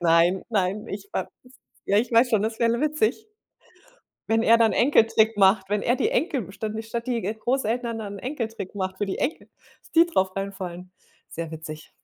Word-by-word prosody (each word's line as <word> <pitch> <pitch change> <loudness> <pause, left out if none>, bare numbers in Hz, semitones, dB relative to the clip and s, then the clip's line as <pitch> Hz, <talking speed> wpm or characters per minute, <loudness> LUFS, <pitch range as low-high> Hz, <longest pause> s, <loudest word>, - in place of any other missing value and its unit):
Nein, 170 +2 +3
nein, 200 -1 0
ich 205 - -7
weiß - - -2 0.6
ja, 200 - +2
ich 235 +2 -1
weiß 235 +2 +5
schon, 215 -2 +2
das 220 +1 -2
wäre 230 0 +3
l 235 - -2
witzig. 305 - 0 1.0
Wenn 225 0 +2
er 230 0 +6
dann 225 -2 +4
Enkeltrick 225 -4 +4
macht, 190 -1 +4
wenn 205 0 0
er 245 - +2
die 435 - +1
Enkel, 295 - -1
statt 215 +1 -5
statt 235 +2 -5
die 240 -2 0
Großeltern 230 +2 -1
dann 205 -2 -6
'n - - -10
Enkeltrick 225 -7 -5
macht, 190 -1 -3
für 205 - 0
die 190 - -3
Enkel, 310 - -3 0.3
dass - - -22
die 330 +1 +6
drauf 190 - 0
reinfallen. 185 -2 -6 0.4
Sehr 165 -1 -5
witzig. 155 -1 -8
220 Hz, 190 wpm, -25 LUFS, 190-235 Hz, 1.0 s, er